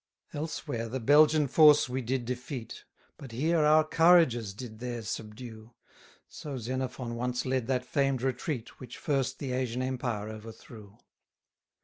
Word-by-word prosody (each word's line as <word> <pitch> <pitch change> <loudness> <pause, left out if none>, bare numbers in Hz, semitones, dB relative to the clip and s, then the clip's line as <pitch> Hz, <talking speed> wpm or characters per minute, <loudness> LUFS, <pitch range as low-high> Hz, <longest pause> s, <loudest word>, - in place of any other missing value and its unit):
93 - - -4
Elsewhere 145 -7 -4
the 130 +3 -3
Belgian 150 +4 +5
force 150 +1 +6
we 130 +1 -3
did 125 +1 -2
defeat, 125 -1 -6 0.3
But 135 -6 -11
here 160 +7 +1
our 155 +1 +5
courages 160 - +4
did 110 -1 -9
theirs 120 -3 -5
subdue: 110 +2 -8 0.5
So 145 -3 -7
Xenophon 125 0 -4
once 125 +1 -2
led 130 -2 -1
that 125 -1 0
famed 135 -2 0
retreat, 125 -1 -3
Which 125 -3 -10
first 135 -4 -1
the 135 -3 -5
Asian 125 -1 -2
empire 120 -5 -3
overthrew. 110 -1 -12
125 Hz, 140 wpm, -29 LUFS, 115-140 Hz, 0.5 s, force